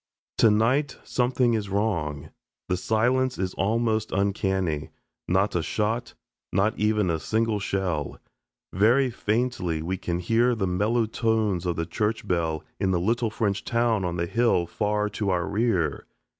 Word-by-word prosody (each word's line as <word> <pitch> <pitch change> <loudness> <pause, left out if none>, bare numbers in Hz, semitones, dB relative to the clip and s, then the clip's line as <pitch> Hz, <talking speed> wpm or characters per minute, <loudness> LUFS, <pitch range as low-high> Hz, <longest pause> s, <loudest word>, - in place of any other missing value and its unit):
Tonight 120 +6 +3
something 125 -1 +1
is 105 -3 -1
wrong. 85 -9 -1 0.4
The 90 - +2
silence 125 +6 +1
is 95 -1 -2
almost 110 +1 0
uncanny. 95 -5 0 0.4
Not 95 +3 +1
a 90 - +2
shot 110 +8 -2 0.4
not 100 +3 +1
even 105 -3 +2
a 80 - -1
single 110 +3 0
shell. 95 -7 -2 0.6
Very 120 +7 +3
faintly 105 -9 -1
we 95 +3 -2
can 85 -3 -2
hear 115 +7 +2
the 105 -4 -1
mellow 105 +6 +1
tones 110 -5 0
of 85 - 0
the 85 - -2
church 110 +4 -2
bell 80 -3 0 0.2
in 95 -1 +1
the 90 -2 +2
little 115 +5 +1
French 105 -2 -1
town 115 -3 +1
on 90 -1 -2
the 85 - 0
hill 115 -3 +2
far 105 +4 -1
to 105 0 -2
our 90 -2 0
rear. 100 - 0
105 Hz, 150 wpm, -25 LUFS, 90-115 Hz, 0.6 s, Tonight